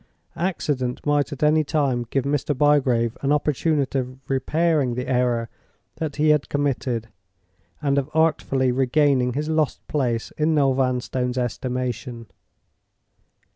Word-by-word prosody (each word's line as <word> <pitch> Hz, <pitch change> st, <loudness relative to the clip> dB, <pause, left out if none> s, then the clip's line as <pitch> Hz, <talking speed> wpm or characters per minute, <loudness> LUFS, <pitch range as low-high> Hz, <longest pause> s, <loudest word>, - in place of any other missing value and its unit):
Accident 145 Hz, -8 st, -2 dB
might 145 Hz, 0 st, +1 dB
at 145 Hz, 0 st, -5 dB
any 155 Hz, +1 st, +4 dB
time 140 Hz, -6 st, 0 dB
give 135 Hz, -, 0 dB
Mr. 145 Hz, 0 st, -1 dB
Bygrave 130 Hz, -5 st, +2 dB
an 140 Hz, -, 0 dB
opportunity 150 Hz, -1 st, +1 dB
of 130 Hz, 0 st, -5 dB
repairing 145 Hz, -1 st, +1 dB
the 125 Hz, +1 st, -4 dB
error 125 Hz, -2 st, +1 dB, 0.5 s
that 155 Hz, -3 st, -3 dB
he 155 Hz, +1 st, +2 dB
had 150 Hz, -2 st, +2 dB
committed, 130 Hz, -5 st, -1 dB, 0.7 s
and 140 Hz, -1 st, +2 dB
of 140 Hz, +1 st, -4 dB
artfully 135 Hz, -5 st, +2 dB
regaining 130 Hz, 0 st, +2 dB
his 150 Hz, +3 st, -2 dB
lost 155 Hz, -2 st, -1 dB
place 120 Hz, -6 st, -1 dB
in 155 Hz, +1 st, +2 dB
Noel 140 Hz, -3 st, +3 dB
Vanstone's 125 Hz, -1 st, -1 dB
estimation. 125 Hz, -1 st, -3 dB
135 Hz, 130 wpm, -23 LUFS, 125-150 Hz, 0.7 s, any